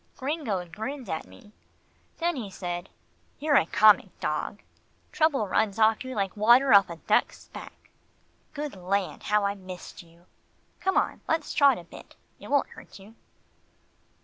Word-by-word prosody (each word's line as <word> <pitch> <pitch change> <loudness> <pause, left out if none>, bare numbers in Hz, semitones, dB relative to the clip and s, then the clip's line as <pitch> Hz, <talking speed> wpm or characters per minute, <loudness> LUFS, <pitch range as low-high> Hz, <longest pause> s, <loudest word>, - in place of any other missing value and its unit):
Gringo 260 - -2
grinned 240 +9 -6
at 160 - -4
me. 95 - -17 0.7
Then 345 0 0
he 230 -7 -5
said, 175 -1 -5 0.5
"You're 300 +1 0
a 165 - +4
comic 205 -1 +4
dog 155 +7 -3 0.5
trouble 305 - +1
runs 205 +1 0
off 220 +1 +3
you 260 0 -7
like 195 -2 -2
water 240 +4 +5
off 200 -2 +6
a 170 - -6
duck's - - -1
back - - -12 0.6
Good 295 -5 -5
land! 190 +1 -2
how 210 -1 +1
I've 200 0 -2
missed 185 -1 -10
you. 170 0 -22 0.5
Come 380 - 0
on, - - 0
let's 320 -1 -1
trot 280 -3 +5
a 175 - -9
bit. 170 - -14 0.2
It - - -11
won't 285 -1 +2
hurt - - -14
you." 200 +3 -15
210 Hz, 155 wpm, -27 LUFS, 185-275 Hz, 0.7 s, off